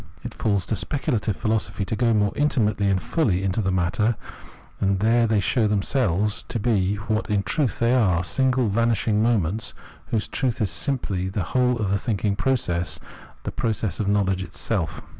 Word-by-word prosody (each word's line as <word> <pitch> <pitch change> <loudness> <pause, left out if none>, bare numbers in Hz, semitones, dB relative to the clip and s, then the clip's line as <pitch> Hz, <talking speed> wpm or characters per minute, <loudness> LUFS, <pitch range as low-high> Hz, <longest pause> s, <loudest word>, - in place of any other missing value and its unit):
It 120 -2 -6
falls 100 -4 0
to 110 - -2
specu 135 +5 -1
lative 105 -3 0
philosophy 110 -1 -1
to 105 - -2
go 115 +2 +2
more 105 -2 +2
intimately 105 -8 +1
and 95 -1 +2
fully 100 - 0
into 95 +3 0
the 95 -2 0
matter, 95 +6 +1 0.6
and 100 -1 +1
there 115 +3 +3
they 110 -1 +2
show 110 +3 +2
themselves 105 -1 0
to - - -2
be 100 -3 +1
what 110 +2 -2
in 100 -2 +1
truth 140 +5 0
they 120 +1 +2
are, 95 -9 +3
single 130 +5 +2
vanishing 110 0 +1
moments, 110 -3 0 0.3
whose 110 -3 -1
truth 130 -4 -1
is 105 -6 0
simply 95 - -1
the 95 0 -2
whole 125 +6 +1
oiE 110 -4 -2
the 100 +1 +1
thinking 105 -3 -1
process, 90 -9 -1 0.4
the - - -3
process 110 -4 -2
of 105 - -1
knowledge 100 -2 +1
itself. 90 - -3
105 Hz, 180 wpm, -24 LUFS, 95-115 Hz, 0.6 s, there